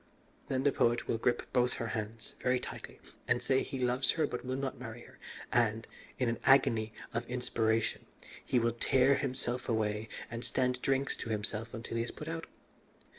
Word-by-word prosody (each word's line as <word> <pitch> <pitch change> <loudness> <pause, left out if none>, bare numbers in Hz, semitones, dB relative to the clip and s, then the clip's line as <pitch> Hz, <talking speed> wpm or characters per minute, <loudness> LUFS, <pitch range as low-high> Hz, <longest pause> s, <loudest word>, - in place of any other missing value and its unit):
Then 130 -1 0
the 140 - +5
poet 120 -2 +2
will 115 - 0
grip 120 +1 +2
both 125 -1 +3
her 115 - -3
hands 110 0 -5
very 125 0 +2
tightly - - -7 0.3
and 125 - +3
say 130 +2 +2
he 135 - -4
loves 125 +1 +2
her 160 -2 +2
but 125 - -4
will 130 +1 -2
not 135 -1 -3
marry 120 -1 -7
her, - - -15 0.3
and, 115 -1 +2 0.3
in 125 - +1
an 115 0 0
agony 115 -5 +5 0.2
of 115 - 0
inspiration, 115 -3 0 0.4
he 130 - +1
will 115 0 +3
tear 130 +3 +4
himself 130 -2 -1
away 110 -1 0 0.2
and 115 +1 -4
stand 125 -1 0
drinks 135 0 +1
to - - -5
himself 110 +1 -2
until 115 +1 -4
he 115 - +2
is 120 - -4
put 150 - -8
out. 165 0 -4
120 Hz, 185 wpm, -33 LUFS, 115-130 Hz, 0.4 s, the